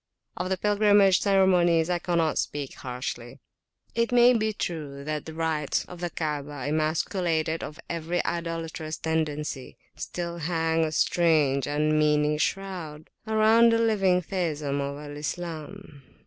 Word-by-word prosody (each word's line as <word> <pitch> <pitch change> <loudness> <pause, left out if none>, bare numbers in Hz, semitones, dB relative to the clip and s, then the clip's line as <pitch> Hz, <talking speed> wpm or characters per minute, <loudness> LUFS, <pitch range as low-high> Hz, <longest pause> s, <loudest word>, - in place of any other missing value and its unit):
Of 180 +1 -3
the 190 - 0
pilgrimage 205 -1 +4
ceremonies 180 -4 +3
I 175 -1 0
cannot 170 -3 0
speak 145 -2 -3
harshly. 125 -1 -6 0.5
It 230 +1 0
may 245 0 +6
be 220 -2 +1
true 150 -8 -5
that 150 0 -4
the 160 - -8
rites 160 -3 -1
of 180 - -11
the 175 0 -2
Kaabah, 145 -4 -4
emasculated 160 +1 0
of 150 - -8
every 170 +1 -2
idolatrous 165 -2 -4
tendency, 150 -4 -3 0.2
still 170 -1 -5
hang 165 0 0
a 155 - -3
strange 155 -5 +2
unmeaning 150 0 +2
shroud 170 -4 -3 0.2
around 220 +2 +5
the - - +4
living 195 -5 +2
theism 155 -6 -2
of 140 0 -4 0.2
Islam. 160 +1 -6
165 Hz, 130 wpm, -26 LUFS, 150-185 Hz, 0.5 s, may